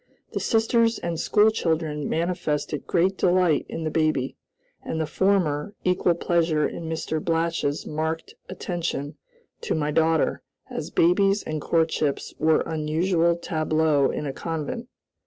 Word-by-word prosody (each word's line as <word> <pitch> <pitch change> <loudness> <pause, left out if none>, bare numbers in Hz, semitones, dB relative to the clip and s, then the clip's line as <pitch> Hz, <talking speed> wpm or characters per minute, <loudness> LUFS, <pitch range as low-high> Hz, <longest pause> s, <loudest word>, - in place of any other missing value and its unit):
The - - -1
sisters 230 0 +2
and 170 -2 -3
school 215 +1 +4
children 160 -7 -1
manifested 160 -3 -2
great 185 +2 +2
delight 180 -4 +3
in 165 - -4
the 155 - -2
baby, 155 -5 0 0.5
and 160 - -4
the 160 - 0
former 190 0 +1
equal 180 -1 +2
pleasure 165 -3 +1
in 165 -1 -6
Mr. 160 -1 -2
Blatch's 165 -3 0
marked 160 +1 -3 0.2
attention 170 -6 -3 0.5
to - - -1
my 150 -1 0
daughter, 160 0 +2 0.3
as - - -4
babies 195 +4 +3
and 155 -1 -4
courtships 160 -3 0
were 160 0 +3
unusual 165 +2 +1
tableaux 155 -3 +1
in - - -3
a 135 - -3
convent. 165 - -4
165 Hz, 135 wpm, -25 LUFS, 155-180 Hz, 0.5 s, school